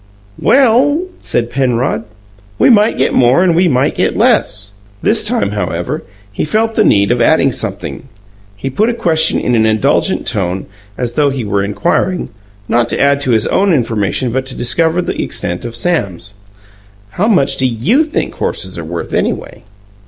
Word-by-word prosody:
"Well," 275 +5 +3 0.2
said 120 0 -2
Penrod, 125 -3 -1 0.5
"we - - +4
might 215 0 +3
get - - +1
more 130 +8 +4
and 175 -3 +2
we 180 +2 +3
might 130 -3 +1
get - - -1
less." 100 -1 +1 0.3
This - - +3
time, - - 0
however, - - -3 0.3
he - - -2
felt 220 +8 0
the 220 - +2
need 100 - +3
of 120 0 +1
adding 135 +1 +3
something. 110 +4 -5 0.5
He 135 +7 -5
put 215 - +1
a 240 - -2
question 160 -6 +3
in 125 - -1
an 110 -1 +3
indulgent 135 - +1
tone, 95 -5 -2 0.3
as 120 -1 -3
though 145 +2 +2
he 135 -3 -3
were 100 -1 -1
inquiring, 175 - -1 0.4
not 120 0 +1
to - - -1
add 140 0 +2
to 135 - -2
his 110 -3 +3
own 195 0 +1
information 115 -1 -1
but 130 +2 -2
to 130 - -4
discover 160 +8 +1
the - - -3
extent 90 +5 -3
of 115 -1 -6
Sam's. 100 - -1 0.8
"How 190 - -1
much 185 -12 +2
do 130 - +2
you 145 - +1
think 310 - -3
horses 95 -2 -3
are - - -5
worth, 85 +1 -6
anyway?" - - -3
130 Hz, 175 wpm, -14 LUFS, 110-175 Hz, 0.8 s, we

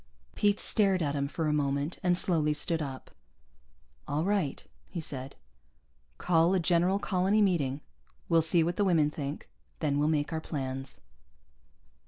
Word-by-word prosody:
Pete 205 0 +2
stared 195 -5 +2
at 140 -2 -1
him 140 -1 -1
for 160 +3 -3
a 150 - +1
moment 140 +2 -1
and 180 -1 +2
slowly 155 -5 +2
stood 160 +2 -1
up. 135 -3 -7 1.0
"All 150 +2 -1
right," 190 -7 -1 0.2
he 175 - -5
said. 135 -3 -4 0.8
"Call 170 +1 +3
a - - +2
general 175 +3 +2
colony 195 +1 +1
meeting. 150 -9 +1 0.5
We'll 165 -1 +4
see 160 +1 +3
what 170 +2 -2
the 205 - +2
women 160 -6 +3
think. 145 -2 -6 0.3
Then 145 -1 0
we'll 150 - +2
make 155 0 0
our 160 - -2
plans." 135 -3 -5
160 Hz, 155 wpm, -29 LUFS, 145-180 Hz, 1.0 s, We'll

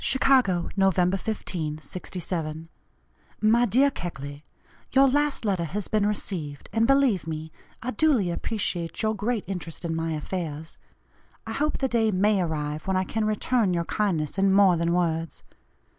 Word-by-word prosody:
"CHICAGO, 250 -10 +3
Nov. 195 -2 +3
15, 180 -4 -1
'67. 165 -1 -5 0.7
"MY 230 +3 +4
DEAR 265 +7 +4
KECKLEY; 145 - -6 0.5
Your 270 +1 +6
last 290 -2 +1
letter 190 -5 0
has 195 +6 -3
been 210 -1 +1
received, 165 -8 -4
and 225 +1 +3
believe 270 -11 +3
me, 160 0 -5 0.3
I 255 - -2
duly 235 - +2
appreciate 170 -2 -2
your 215 0 +2
great 220 +1 -1
interest 175 -3 -5
in 165 -1 -1
my 165 0 -1
affairs. 160 -1 -5 0.7
I - - -5
hope 300 +1 0
the 270 - 0
day 230 -3 +2
may 200 0 +2
arrive 155 -1 -3
when 190 -1 +1
I 185 - +2
can 215 +3 -2
return 215 -2 +1
your 170 0 -1
kindness 180 -5 -1
in 195 0 +4
more 195 -2 +6
than 170 0 0
words. 165 -3 -1
190 Hz, 155 wpm, -26 LUFS, 165-220 Hz, 0.7 s, Your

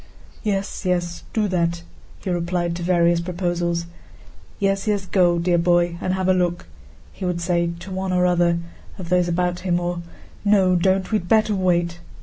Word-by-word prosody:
"Yes, 200 -2 -2
yes, 175 -2 -1
do 215 -2 +1
that," 170 -1 0 0.4
he 185 - -2
replied 175 0 -1
to - - -6
various 170 -1 +3
proposals. 175 -1 -1 0.7
"Yes, 195 0 0
yes: 205 -2 0
go, 180 -2 +3
dear 175 0 +2
boy, 175 0 +2
and 185 - 0
have 190 -1 -1
a 185 - +5
look," 175 -1 0 0.5
he 195 - -9
would 180 -1 -1
say 170 0 +1
to 190 - -8
one 190 0 -2
or 180 0 +2
another 175 -1 +3 0.4
of 180 -3 -7
those 180 -1 +3
about 175 +1 0
him; 175 -2 0
or, 175 0 -3 0.4
"No, 195 -3 +4
don't, 190 +3 +1
we'd 210 -5 -1
better 220 -1 +4
wait!" 175 -3 +1
180 Hz, 170 wpm, -22 LUFS, 175-190 Hz, 0.7 s, a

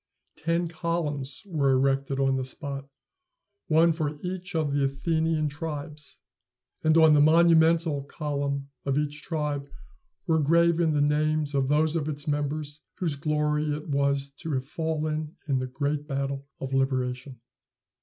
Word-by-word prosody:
Ten 170 +1 0
columns 160 -2 -2
were 155 -8 +1
erected 135 +1 +1
on 135 -1 +2
the 130 - -1
spot, 140 +1 -6 0.8
one 165 +1 +5
for 155 -2 -2
each 185 0 -4
of 155 -3 0
the 140 -1 +2
Athenian 160 +3 0
tribes; 150 -1 -6 0.7
and 155 +1 +4
on 160 -1 +7
the 145 - +5
monumental 165 -1 +5
column 140 -1 -3
of 140 0 0
each 150 0 -2
tribe 150 -3 -3 0.6
were 160 -3 +2
graven 170 +1 +3
the 145 - +2
names 150 0 +1
of 135 -2 +1
those 155 +2 +2
of 155 -2 -1
its 145 +1 -4
members 145 0 -2
whose 165 -5 -1
glory 150 0 0
it 150 +1 -4
was 140 0 +1
to 160 -1 -4
have 130 -1 -1
fallen 155 0 -2
in 135 -3 +1
the 130 - -3
great 145 +3 -2
battle 140 -1 -3
of 135 0 -5
liberation. 130 -1 -1
150 Hz, 145 wpm, -27 LUFS, 140-160 Hz, 0.8 s, on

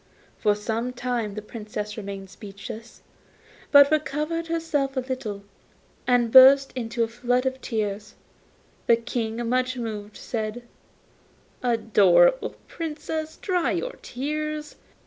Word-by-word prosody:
For 210 -2 +3
some 225 +4 -3
time 240 -4 -2
the 215 - -5
Princess 210 -1 -6
remained 195 -2 -7
speechless; 205 +3 -10 0.7
but 285 0 +8
recovering 310 +2 -1
herself 315 -5 -1
a - - +2
little, 235 -6 -5 0.7
she 250 - +6
burst 265 +3 +8
into 235 -1 -1
a - - 0
flood 245 +2 0
of 260 0 -2
tears. 210 -1 -3 0.7
The 235 - +7
King, 230 0 -3
much 255 +1 0
moved, 215 -3 -5
said, 220 +1 -4 1.0
'Adorable 230 - +4
Princess, 315 -1 -5
dry 360 -3 0
your - - -2
tears. 300 +3 -4
245 Hz, 115 wpm, -25 LUFS, 215-285 Hz, 1.0 s, but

